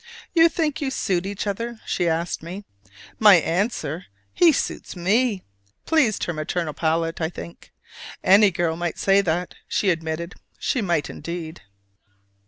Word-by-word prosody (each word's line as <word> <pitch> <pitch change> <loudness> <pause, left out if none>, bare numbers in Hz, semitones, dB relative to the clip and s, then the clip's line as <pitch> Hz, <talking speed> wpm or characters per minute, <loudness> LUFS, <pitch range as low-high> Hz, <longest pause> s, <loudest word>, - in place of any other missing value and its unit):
"You 330 -1 +6
think 320 -2 -1
you 280 - 0
suit 190 -8 -1
each 200 +1 -4
other?" 230 +3 -3
she 175 -2 0
asked 165 +1 -1
me. 180 +5 -7 0.6
My 210 -3 +8
answer, 180 - -1 0.3
"He 345 -2 +6
suits - - -3
me!" 200 +4 +1 0.4
pleased 290 -10 +2
her 175 - -2
maternal 155 +1 -3
palate, 165 +2 -1
I 160 - 0
think. 85 - -10 0.5
"Any 200 +2 +6
girl 170 -2 -1
might 175 0 -3
say 195 0 +4
that!" 175 -1 -2
she 195 - +1
admitted. 165 +1 -3 0.2
(She 255 - -1
might 170 -6 0
indeed!) 165 -2 -7
180 Hz, 145 wpm, -23 LUFS, 165-210 Hz, 0.6 s, My